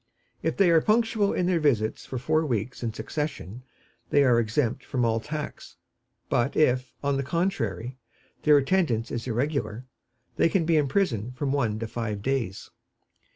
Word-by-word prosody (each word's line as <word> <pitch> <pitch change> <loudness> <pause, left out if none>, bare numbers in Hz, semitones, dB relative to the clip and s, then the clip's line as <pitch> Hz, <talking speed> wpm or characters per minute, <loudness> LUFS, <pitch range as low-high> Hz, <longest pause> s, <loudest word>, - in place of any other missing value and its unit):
If - - -1
they 195 -4 +5
are 165 -1 +5
punctual 220 -1 +2
in 180 - 0
their 180 -2 +2
visits 115 -8 0
for 130 - -4
four 155 +5 +1
weeks 125 -4 -2
in 115 -2 -2
succession 125 - -5 0.5
they 145 - +4
are 125 -3 +4
exempt 120 +3 0
from 125 -4 -1
all 115 0 +1
tax; 150 +5 -6 0.5
but 120 +4 0
if, 130 -4 +2
on 140 -1 +1
the - - 0
contrary, 130 - -2 0.4
their 150 -1 +6
attendance 135 -7 +1
is 120 +1 -4
irregular, 125 -2 -2 0.5
they - - +4
can 170 -1 +1
be 165 0 +3
imprisoned 130 - 0
from 135 +1 -1
one 115 -7 0
to 115 +1 -4
five 110 -3 -4
days. 125 -7 -2
130 Hz, 160 wpm, -26 LUFS, 115-155 Hz, 0.5 s, their